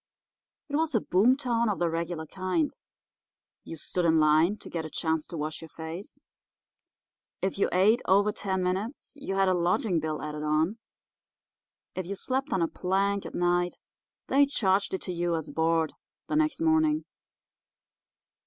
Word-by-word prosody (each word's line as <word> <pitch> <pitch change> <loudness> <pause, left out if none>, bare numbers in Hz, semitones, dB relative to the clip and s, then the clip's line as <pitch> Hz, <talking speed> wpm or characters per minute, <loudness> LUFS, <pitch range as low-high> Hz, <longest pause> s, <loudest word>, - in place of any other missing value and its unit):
It 290 - -3
was 315 -3 +1
a - - +5
boom 225 +9 +4
town 235 -4 +1
of 205 - 0
the 175 - +1
regular 165 0 -3
kind—you 185 - -6
stood 175 +3 -1
in 160 -1 +4
line 155 +6 +4
to - - -10
get 165 -2 -3
a 160 - -6
chance 160 -1 -1
to 170 - -7
wash 155 +1 -4
your 165 - -10
face; 165 +5 -7 1.2
if 190 +1 -1
you - - +3
ate 210 +7 +4
over 200 +2 +4
ten 190 -3 -2
minutes 195 +12 -3
you 275 -9 -4
had 195 0 +3
a 185 - +4
lodging 180 +1 +1
bill 155 -1 -3
added 150 0 -4
on; 155 +8 +1 1.1
if 185 -2 -4
you 200 - -3
slept 265 +7 -2
on 180 - +2
a - - +2
plank 195 +3 0
at - - -9
night 175 0 +1 0.5
they 280 +1 +4
charged 195 -7 +1
it - - -5
to 180 - -3
you 175 0 0
as 160 - -4
board 160 -1 +1 0.3
the - - -1
next 310 +1 +1
morning. 315 -1 +3
185 Hz, 165 wpm, -28 LUFS, 165-220 Hz, 1.2 s, a